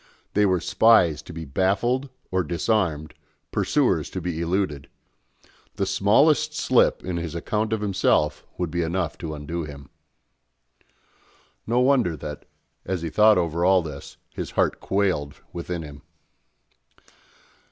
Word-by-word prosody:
They 105 0 +3
were 95 -1 +2
spies 95 -7 +4
to - - -11
be 80 -1 -7
baffled 100 - 0 0.2
or 95 0 +1
disarmed, 85 -4 -1 0.4
pursuers - - +1
to 95 - -5
be 85 -2 -3
eluded. 85 -5 -1 0.9
The 100 - 0
smallest 105 +10 +3
slip - - +3
in 90 -1 -2
his 85 -1 -4
account 105 +6 -2
of 110 -1 -1
himself 75 -7 +1
would 90 -3 -2
be 85 +1 -1
enough 85 0 -1
to 80 -2 -5
undo 80 +3 -4
him. 70 -2 -10 1.8
No 120 +2 +2
wonder 125 - +2
that, 75 +1 -7 0.4
as 90 -3 -3
he 80 - -3
thought 110 -1 +5
over 85 -1 0
all 95 -1 +4
this, 75 -3 -9 0.2
his - - -5
heart - - +2
quailed 95 -8 -1
within 85 -1 -4
him. 75 -1 -10
90 Hz, 135 wpm, -24 LUFS, 80-100 Hz, 1.8 s, thought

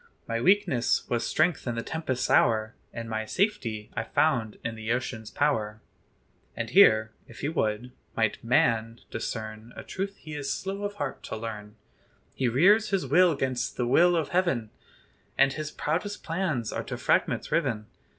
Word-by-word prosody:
My 115 0 -1
weakness 180 -10 +2
was 120 -1 0
strength 160 -3 +1
in 120 - -1
the 115 - -3
tempest's 145 -5 -2
hour, 110 0 +3 0.2
And 115 0 -6
my 110 -1 -2
safety 125 - -1
I - - 0
found 115 -3 +1
in 115 - -2
the 110 0 -4
ocean's 120 -3 -3
power." 110 -8 0 0.8
And - - -3
here, 110 0 +6 0.2
if 115 - -12
he 145 - -1
would, 120 -5 -1 0.3
might 110 -2 0
man 115 -1 +2
discern 110 0 -5
A - - -8
truth 195 +1 -4
he 155 - -10
is 145 -2 -3
"slow 195 +1 -3
of 205 0 -4
heart" 205 - -4
to - - -5
learn. 105 -1 -7 0.6
He 130 - 0
rears 200 - +4
his 195 -2 0
will 180 -3 +4
'gainst 130 -2 -2
the 125 - 0
will 175 +8 +5
of 160 -4 0
heaven, 155 -12 0 0.7
And 135 0 +4
his 155 0 -4
proudest 180 +8 -3
plans 160 - -2
are - - -3
to - - -5
fragments - - +1
riven. 110 -1 0
125 Hz, 170 wpm, -27 LUFS, 110-165 Hz, 0.8 s, here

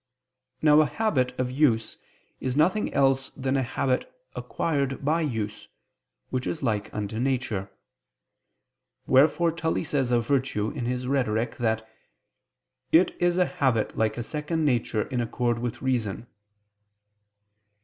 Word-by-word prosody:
Now 150 0 +7
a 155 - +2
habit 130 - 0
of 125 -1 0
use 125 -6 +2 0.4
is 130 +1 -2
nothing 185 +7 +2
else 135 -1 +2
than 135 0 -1
a 135 - +2
habit 130 +1 -1 0.2
acquired 140 -4 -2
by 160 +3 +2
use, 110 -8 -3 0.6
which 130 -1 -2
is 160 - -3
like 105 -4 -1
unto 105 +1 -4
nature. 120 -7 -1 1.4
Wherefore 155 +5 +4
Tully 165 0 -1
says 140 -5 -1
of 120 -2 +2
virtue 125 -5 0
in 120 - -4
his 125 0 -2
Rhetoric 120 -4 0
that 110 -2 -1 1.0
"it 170 +3 +4
is 175 0 +2
a 180 - +4
habit 130 -12 0
like 110 0 0
a 120 - -2
second 155 +4 -2
nature 120 -5 +1
in 125 -3 -2
accord 120 0 -1
with 120 +1 -4
reason." 120 -5 -1
130 Hz, 135 wpm, -26 LUFS, 115-150 Hz, 1.4 s, Now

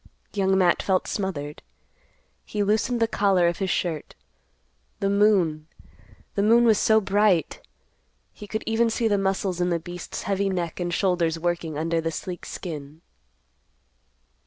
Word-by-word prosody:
Young 190 -1 +2
Matt 180 -2 +3
felt 190 -2 0
smothered. 150 -7 -4 0.8
He 210 -1 -2
loosened 220 +4 +1
the 230 - +3
collar 195 -5 +2
of 170 - -1
his 190 -1 -1
shirt. 165 -5 -2 0.8
The 195 0 0
moon—the 190 -2 -1
moon 230 +3 +5
was 225 -3 +4
so 220 0 +4
bright! 200 -3 +1 0.7
He 210 - -11
could 220 +1 -3
even 225 +1 +2
see 225 0 0
the 205 -2 +2
muscles 190 -2 -1
in 175 - +1
the 170 - +1
beast's 175 +1 -7
heavy 195 0 0
neck 175 -3 -3
and 175 -1 -2
shoulders 175 -3 +1
working 170 -2 -2
under 165 +1 0
the 165 - -1
sleek 175 +2 -6
skin. 155 -3 -7
190 Hz, 145 wpm, -25 LUFS, 170-205 Hz, 0.8 s, moon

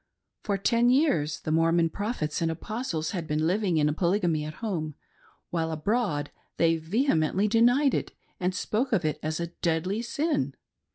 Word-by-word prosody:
For 200 -2 -1
ten 235 +4 +3
years 170 - +2
the 155 - -3
Mormo'n, 165 +1 +3
Prophets 205 -8 -2
and 165 - +1
Apostles 165 -2 -3
had 170 -4 -4
been 155 +1 0
living 185 -1 +1
in 150 -1 +2
Polygamy 170 -2 +1
at 155 0 -6
home,, 165 -10 -3 0.6
while 165 -1 -1
abroad 160 - -1 0.3
they 165 0 +4
vehemently 185 - +1
denied 245 +6 +4
it - - -1 0.3
and 185 0 -1
spoke 235 +7 -1
of 185 -7 +2
it 155 - -1
as 155 +1 -2
a 170 - -2
deadly 180 +6 0
sin. 240 - -1
170 Hz, 160 wpm, -27 LUFS, 155-220 Hz, 0.6 s, they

